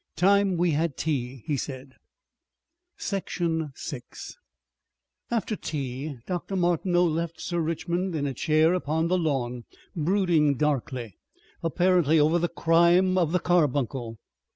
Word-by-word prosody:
"Time 195 +1 +3
we 175 0 +2
had 155 -1 -1
tea," 130 -5 -3
he 150 - 0
said. 130 0 -6 1.0
Section 165 -5 -2
6 130 -5 -8 0.9
After 230 -2 -1
tea 140 -3 -5
Dr. 180 +2 -4
Martineau 175 0 +2
left 165 0 -2
Sir 175 -1 -2
Richmond 170 +2 -2
in 145 -2 -1
a 140 - -2
chair 155 +4 +3
upon 160 -1 0
the 185 - +2
lawn, 125 -7 -2 0.3
brooding 165 -4 +2
darkly 130 -7 -2 0.4
apparently 170 -2 +3
over 155 +3 +3
the 175 0 0
crime 170 +3 +3
of 170 -4 +2
the 180 - +3
carbuncle. 135 -9 0
160 Hz, 125 wpm, -26 LUFS, 140-175 Hz, 1.0 s, Time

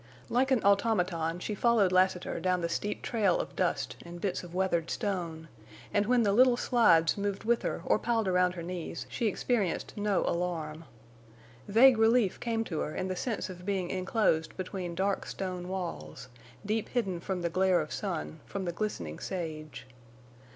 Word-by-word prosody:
Like 255 +3 +2
an 260 -5 +2
automaton 180 -5 +2
she 195 +4 -4
followed 210 -3 +3
Lassiter 185 -1 +2
down 180 -1 +1
the 170 - -1
steep 205 +4 -3
trail 210 -7 +2
of - - -5
dust 180 -2 -1
and 175 0 -9
bits 185 -1 -2
of 175 0 -10
weathered 175 -3 0
stone; 170 -5 -3 0.5
and 205 0 +2
when 245 -1 +4
the 200 -2 +2
little 250 +2 +5
slides 200 -10 +4
moved 200 -1 -2
with 235 +1 +2
her - - -3
or - - +3
piled 225 -3 0
around 180 0 +2
her 170 - -5
knees 175 -1 -5
she 235 - -1
experienced 210 -3 -1
no 205 -2 +1
alarm. 165 -2 -2 0.8
Vague 230 +3 +6
relief 225 -3 +3
came 225 -1 -1
to 165 -8 -4
her 155 - -3
in 185 - -2
the 185 - -2
sense 220 +3 -2
of 180 -2 -9
being 190 -2 -1
enclosed 185 -4 0
between 185 -2 -4
dark 195 +2 0
stone 180 -2 -4
walls, 175 -9 -5 0.4
deep 215 +1 -1
hidden 195 -8 -1
from 180 0 -3
the 170 - +1
glare 185 0 +3
of 155 -1 -4
sun, 170 -5 -4
from 195 -1 -4
the 175 - -1
glistening 125 - -4
sage. 155 -4 -5
185 Hz, 175 wpm, -30 LUFS, 175-215 Hz, 0.8 s, Vague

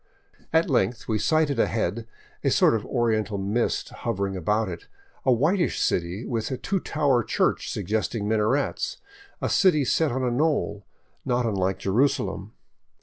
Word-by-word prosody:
At 160 +1 +3
length 125 -5 0
we 110 -2 0
sighted 155 -3 +2
ahead, 115 0 0 0.4
a - - +3
sort - - +4
of 110 -2 -1
oriental 110 -4 0
mist 100 +5 -1
hovering 100 -4 -3
about 105 +5 0
it, 85 -2 -7 0.4
a - - +6
whitish 165 - +2
city 90 +6 -1
with 115 -3 -2
a 130 - -3
two 195 +7 -1
tower 145 -7 +1
church - - 0
suggesting 105 +2 -2
minarets, 110 +6 0 0.5
a - - +2
city 155 -8 +3
set 160 +4 +2
on 130 +2 -2
a 125 - +1
knoll, 120 -7 0 0.4
not 125 0 0
unlike 95 -3 0
Jerusalem. 120 +8 0
115 Hz, 145 wpm, -25 LUFS, 105-140 Hz, 0.5 s, a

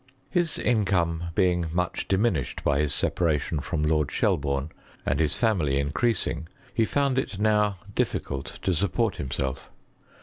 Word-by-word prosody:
His 175 -3 +1
income 90 -7 +1
being 90 -2 +2
much 90 +1 -1
diminished 105 +5 0
by 70 -1 +2
his 75 -1 +1
sepa - - 0
ration 80 -1 +1
from 75 +2 -2
Lord 75 -2 +2
Shelburne, 70 +1 0 0.3
and 70 - +1
his 75 -3 +2
family 95 - +1
increas 70 - +1
ing, 80 - -4 0.3
he 115 - +3
found 140 +1 +1
it 105 -6 -3
now 105 -1 +2 0.2
difficult 70 -7 -2
to 95 - +2
support 100 +4 +1
himself. 65 -1 -3
85 Hz, 145 wpm, -26 LUFS, 75-105 Hz, 0.3 s, he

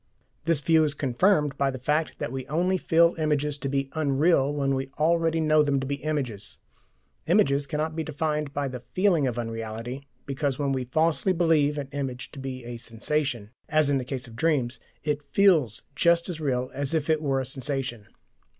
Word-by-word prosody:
This 165 -3 +2
view 160 +1 +4
is 150 -1 -1
confirmed 145 +2 +1
by 140 -1 +3
the 130 - -4
fact 150 +5 -1
that - - -4
we 130 -1 -5
only 180 +5 +1
feel 170 +1 +4
images 150 -2 0
to 135 - -3
be 135 0 -1
"unreal" 145 -1 +2
when 140 -2 0
we 135 0 -2
already 165 +1 +2
know 155 -1 +4
them 140 -2 +2
to 135 - -3
be 140 +1 -2
images. 140 -9 -3 0.7
Images 140 +1 +3
cannot 155 +1 -2
be 160 - -2
defined 150 -1 -2
by 140 0 -2
the 130 -1 -6
FEELING 175 - +1
of 120 -2 -3
unreality, 115 +3 -5 0.2
because 140 -1 -2
when 140 -2 0
we 130 -2 -1
falsely 160 +7 +1
believe 160 -4 +2
an 140 -2 -3
image 135 -3 -4
to 140 - -10
be 130 -2 -6
a 120 0 -6
sensation, 120 -1 -2 0.2
as 155 -2 +3
in 140 - +2
the - - -3
case 125 -1 -5
of 115 - -12
dreams, 130 -3 0 0.2
it 150 -1 -1
FEELS 150 - +3
just 170 +1 +3
as 165 -3 -5
real 130 -3 -1
as 140 +2 -1
if 155 -2 0
it 155 -1 +2
were 135 -3 +1
a 130 - -2
sensation. 130 -4 -3
140 Hz, 195 wpm, -26 LUFS, 130-155 Hz, 0.7 s, view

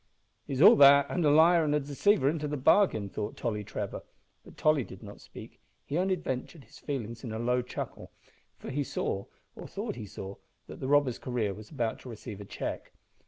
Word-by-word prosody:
"He's 135 +3 +1
all 215 +4 +10
that, 140 0 +8
and 180 - 0
liar 160 +3 +5
and 150 -1 +1
deceiver 145 +3 +2
into 150 0 0
the 150 0 -3
bargain," 140 - +3
thought 105 +2 -5
Tolly 105 -4 -2
Trevor, 105 -1 -5 0.4
but - - -16
Tolly 155 -3 +3
did 95 -2 -12
not 105 0 -11
speak; - - -12 0.3
he 145 - -4
only 185 +2 +2
vented 145 -1 -5
his - - -17
feelings 120 -5 -5
in 120 - -5
a 110 - -4
low 125 +2 +1
chuckle, 125 - -7 0.5
for - - -8
he 145 +2 -1
saw, 100 -6 -3 0.3
or - - -9
thought - - -5
he 110 -3 -7
saw, 95 +1 -8 0.3
that - - -11
the 130 - -4
robber's 140 -3 +2
career 115 -5 -2
was 105 +1 -12
about 120 -7 -2
to 130 - -11
receive 110 -2 -8
a - - -8
check. - - -6
130 Hz, 200 wpm, -29 LUFS, 110-150 Hz, 0.5 s, all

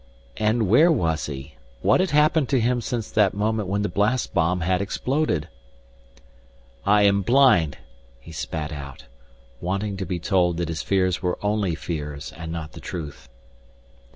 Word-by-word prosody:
And 110 0 +1
where 150 - +6
was 80 - 0
he? 70 0 -8 0.3
What - - +4
had 185 0 +1
happened 150 -1 +3
to 135 - +3
him 120 +1 +1
since 115 -1 -4
that 100 -3 +3
moment 105 -1 -1
when 100 +1 0
the - - +1
blast 105 +7 0
bomb 90 0 +1
had 90 +3 +1
exploded? 125 - -1 1.4
"I 105 0 +5
am 100 0 +4
blind," 110 - +4 0.4
he - - -13
spat 80 -1 -4
out, 70 -4 -8 0.6
wanting 100 +3 -2
to 95 - -3
be 90 0 -2
told 90 0 +1
that 85 -1 -2
his 80 -1 -3
fears 95 -2 +1
were 90 -2 -1
only 105 -4 0
fears 75 -3 -5
and 80 0 -7
not 80 -2 -5
the - - -11
truth. 70 -8 -7
95 Hz, 160 wpm, -24 LUFS, 80-110 Hz, 1.4 s, where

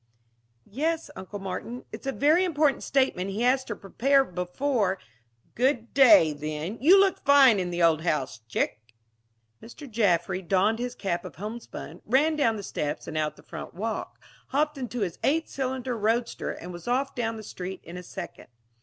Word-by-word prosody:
"Yes, 315 +8 -2
Uncle 190 +2 -7
Martin. 195 +6 -6
It's - - -8
a - - +1
very 305 +7 +3
important 300 -5 +2
statement 260 -9 +1
he 200 +3 -3
has 260 +2 +3
to 210 - -4
prepare 270 +8 +2
before 190 +3 -1 0.3
" 115 0 -40
"Good 245 -1 0
day, 240 - +7
then. 155 +7 -5
You 360 +8 +7
look 390 -1 +2
fine 275 -6 +6
in 180 -1 -2
the 175 0 -1
old 160 -2 +4
house, 150 -8 -1
chick!" 110 - -1 0.8
Mr. 280 +5 -11
Jaffry 190 -5 +1
donned 195 +5 +2
his 245 0 -3
cap 175 -4 -2
of - - -9
homespun, 215 +5 -8
ran 290 +7 +3
down 235 -7 +2
the 205 - -6
steps 150 -4 -4
and - - -6
out 155 -1 -1
the - - -18
front - - -8
walk, 220 +4 -4 0.3
hopped 300 +2 0
into 245 -2 -4
his 180 -4 -2
eight 320 +3 +2
cylinder 260 -2 -3
roadster, 230 +2 -1
and 180 +1 -8
was 175 +6 -10
off 265 +3 0
down 225 -2 -2
the 215 - -8
street 185 -2 -7
in 170 - -10
a 180 - -6
second. 180 - -8
225 Hz, 180 wpm, -27 LUFS, 180-270 Hz, 0.8 s, day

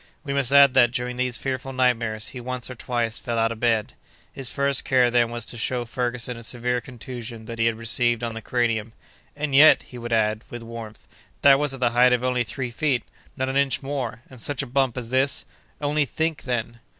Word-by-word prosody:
We 140 -2 -3
must 140 -2 +3
add 140 -2 +7
that, 120 - +5
during 125 0 -3
these 125 -1 0
fearful 135 +1 -4
nightmares, 115 -4 0
he 125 - -8
once 125 0 -4
or - - -5
twice 120 -2 -2
fell 120 -2 -3
out 115 0 +2
of 115 - -6
bed. 115 -3 +1 0.4
His 135 -2 -2
first 140 -1 +1
care 125 -2 +3
then 120 -1 +3
was 120 -1 -3
to 120 - -7
show 120 +1 -1
Ferguson 120 0 -3
a 115 - -10
severe 125 +1 -2
contusion 120 -1 -8
that 115 0 -7
he 115 - +3
had 115 - +1
received 120 +1 +2
on 115 -1 -2
the 115 - -6
cranium. 115 -2 -1 0.4
"And 150 -1 -3
yet," 150 +3 +7
he 125 - -11
would 120 0 -6
add, 110 -1 +1
with 120 -1 -7
warmth, 115 -2 -9 0.4
"that 140 -1 +7
was 145 -2 +1
at 130 - -12
the 120 -1 +3
height 125 +1 +5
of 125 0 0
only 125 -1 +1
three 125 0 -5
feet—not 130 0 -3
an 135 +1 -1
inch 140 -2 +1
more—and 130 -3 -5
such 140 +1 0
a - - -5
bump 130 -1 0
as 120 -1 -5
this! 135 +2 +2 0.3
Only 150 0 +1
think, 160 +3 -2
then!" 120 -2 -3
125 Hz, 215 wpm, -24 LUFS, 115-130 Hz, 0.4 s, add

